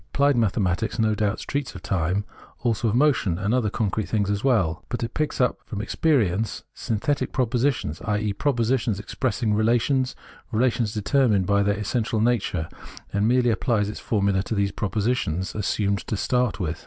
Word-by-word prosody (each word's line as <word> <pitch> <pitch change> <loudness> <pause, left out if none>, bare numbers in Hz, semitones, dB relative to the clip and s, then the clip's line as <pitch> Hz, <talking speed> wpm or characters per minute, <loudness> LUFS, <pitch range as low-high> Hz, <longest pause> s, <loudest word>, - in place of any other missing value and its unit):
Applied 140 0 +4
mathematics, 105 -1 0
no 110 -2 +2
doubt, 105 0 -1
treats 140 -5 -3
of 95 - -9
time, 90 +3 0 0.3
as - - -28
also 115 0 +1
of 110 - +1
motion, 125 - +2
and 100 +4 0
other 125 -4 +2
concrete 105 -1 -2
things 105 -2 +1
as 100 -1 -2
well; 105 -12 +1
but 120 0 -3
it 115 - -4
picks 155 -1 -2
up/ 125 - +2
from 105 - -6
ex 110 - -4
perience 110 - +1
synthetic 140 +6 -1
propositions 125 - 0
— - - -9
i.e. 105 -1 0
propositions 120 -3 0
ex 100 - -8
pressing 115 -4 0
relations, 120 +4 +2 0.4
relations 115 -1 +1
determined 105 -2 +2
by 100 +2 +3
their 100 +1 +1
es 105 -1 -4
sential 115 -2 0
nature 105 -8 0 0.2
— - - -17
and 100 +1 +2
merely 125 0 +3
applies 110 -2 +1
its 105 - -6
formulae 100 -3 +1
to 110 - -3
those 100 -1 +1
propositions 100 -4 -1
assumed 100 -1 0
to 110 - -1
start 125 0 0
with. 85 -3 -2
110 Hz, 185 wpm, -24 LUFS, 100-125 Hz, 0.4 s, Applied